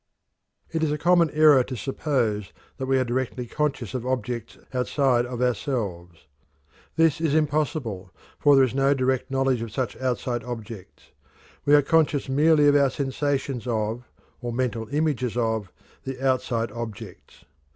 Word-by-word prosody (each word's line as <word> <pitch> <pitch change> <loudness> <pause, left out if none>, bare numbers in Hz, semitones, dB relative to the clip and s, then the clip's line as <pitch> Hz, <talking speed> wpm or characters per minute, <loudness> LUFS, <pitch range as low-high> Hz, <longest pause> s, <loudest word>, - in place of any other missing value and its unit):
It 160 - -1
is 155 -2 +1
a 150 - -1
common 170 +1 +4
error 150 -4 +5
to 130 - -6
suppose 115 -4 -1 0.2
that 130 - -4
we 135 0 +3
are 130 - +2
directly 125 0 -2
conscious 140 -4 -2
of 125 -3 -3
objects 125 -2 -3 0.2
outside 125 -1 +1
of 125 0 -3
ourselves. 100 - -3 0.7
This 165 -1 +3
is 155 -3 +1
impossible, 140 - -1 0.3
for 145 -1 +5
there 135 - +6
is 125 - -4
no 135 +1 +3
direct 130 -1 0
knowledge 135 -2 +1
of 115 -2 -5
such 130 +1 -2
outside 125 -2 -2
objects. 115 -5 -9 0.5
We 145 - +6
are 145 - +5
conscious 155 -2 +2
merely 150 +2 +4
of 145 - +5
our 140 -1 +4
sensations 135 -1 -2
of, 110 +1 -2 0.4
or 120 -1 -3
mental 115 -2 -2
images 140 -5 -1
of, 110 -5 -1 0.3
the 135 -1 -6
outside 130 -3 0
objects. 115 -3 -9
130 Hz, 150 wpm, -25 LUFS, 120-145 Hz, 0.7 s, there